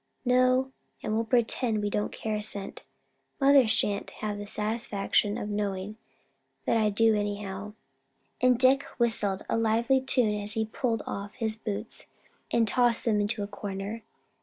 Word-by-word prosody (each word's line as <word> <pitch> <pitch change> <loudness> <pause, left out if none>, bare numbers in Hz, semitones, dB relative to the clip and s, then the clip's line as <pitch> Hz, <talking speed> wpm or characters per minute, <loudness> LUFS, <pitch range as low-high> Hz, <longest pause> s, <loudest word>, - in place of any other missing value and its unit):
"No; 255 +1 +3 0.3
and 215 - -2
we'll 225 +1 0
pretend 230 -2 +1
we 205 - -1
don't 210 - -1
care 220 - -4
a 210 - -2
cent. 200 -2 -1 0.6
Mother 275 -3 +6
sha'n't 205 -2 +1
have 210 -1 -3
the 205 - -7
satisfaction 210 -1 0
of - - -4
knowing 205 -1 -3 0.7
that - - +2
I 215 -2 +3
do 225 +2 +3
anyhow;" 205 -1 -4 0.7
and 250 -1 +4
Dick 260 +2 +5 0.2
whistled 210 -5 +2
a - - 0
lively 230 +4 +2
tune 225 -5 +1
as 205 +1 +2
he 220 0 0
pulled 225 0 -2
off 200 0 -6
his 220 -3 -2
boots 215 0 -4 0.4
and 230 -1 +2
tossed 240 0 +2
them 215 -3 +2
into 205 +1 -1
a - - -4
corner. 205 +2 -5
215 Hz, 160 wpm, -28 LUFS, 205-235 Hz, 0.7 s, Mother